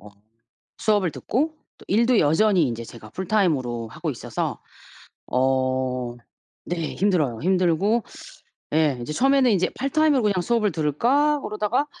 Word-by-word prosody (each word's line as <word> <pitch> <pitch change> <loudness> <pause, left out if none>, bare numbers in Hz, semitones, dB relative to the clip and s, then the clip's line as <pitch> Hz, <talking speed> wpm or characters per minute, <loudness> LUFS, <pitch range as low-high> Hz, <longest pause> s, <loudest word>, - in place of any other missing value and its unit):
어 105 - -13 0.7
수업을 205 -5 +1
듣고 305 +7 -1 0.2
또 - - -16
일도 230 +4 +3
여전히 175 +4 +3
인제 115 -2 -4
제가 110 -2 -12
풀타임으로 155 - 0
하고 - - -4
있어서 - - -4 0.7
어 130 -1 0 0.5
네, 170 -2 -3
힘들어요. 165 - +1
힘들고 185 +5 +2 0.7
예 155 -4 +2
이제 135 +6 -5
처음에는 270 - +3
이제 185 -3 +2
'파트타임으로 280 0 +2
그냥 200 -4 +1
수업을 215 +2 +1
들을까?' 245 - +2
그러다가 215 +5 -1
185 Hz, 310 characters per minute, -23 LUFS, -, 0.7 s, 일도